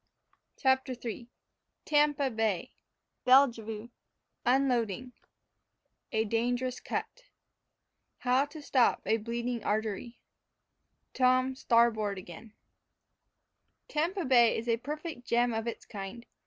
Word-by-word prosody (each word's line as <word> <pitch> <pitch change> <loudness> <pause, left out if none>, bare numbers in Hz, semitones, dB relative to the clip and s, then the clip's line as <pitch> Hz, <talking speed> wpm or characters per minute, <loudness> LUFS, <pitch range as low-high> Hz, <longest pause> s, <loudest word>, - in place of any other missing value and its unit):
CHAPTER 265 -1 +2
III 235 0 -6 0.6
TAMPA 295 -2 +2
BAY 220 -4 -1 0.5
BELLEVUE 235 -4 +3 0.6
UNLADING 250 -2 +1 1.0
A 220 0 +1
DANGEROUS 245 +3 -1
CUT - - -5 1.0
HOW 255 +2 +3
TO 295 +1 -11
STOP 255 -4 +2
A 220 - +2
BLEEDING 235 +1 -3
ARTERY 220 +2 -2 0.9
TOM 255 0 +3
STARBOARD 230 -5 +2
AGAIN 185 +4 -11 1.3
Tampa 340 +5 -1
Bay 240 -3 +5
is 230 - -5
a 230 -1 +2
perfect 295 +1 -6
gem 240 0 +2
of 225 +1 -2
its 235 - -5
kind. 210 +3 -8
240 Hz, 100 wpm, -30 LUFS, 225-265 Hz, 1.3 s, Bay